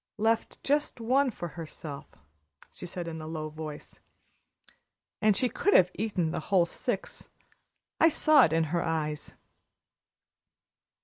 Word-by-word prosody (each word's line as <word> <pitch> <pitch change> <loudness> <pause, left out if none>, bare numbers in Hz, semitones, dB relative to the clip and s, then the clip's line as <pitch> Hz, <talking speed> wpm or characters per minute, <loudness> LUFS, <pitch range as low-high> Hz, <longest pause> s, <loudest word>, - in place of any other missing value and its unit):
"Left 225 +1 0
just 290 -2 0
one 260 +4 +2
for 175 -7 -6
herself," 155 -2 -8 0.6
she 180 - -8
said, 175 0 -6
in 160 -1 -5
a 155 - -7
low 155 -1 -4
voice. 155 -1 -8 1.2
"And 215 -2 +4
she 255 - +2
could 405 +10 +1
have 180 0 +6
eaten 190 -6 -1
the - - -2
whole 185 -3 +4
six - - -4 0.7
I 330 - +7
saw 310 -3 +5
it 155 - -2
in 165 0 +2
her 170 - +2
eyes." 155 -2 -2
175 Hz, 135 wpm, -29 LUFS, 160-230 Hz, 1.2 s, I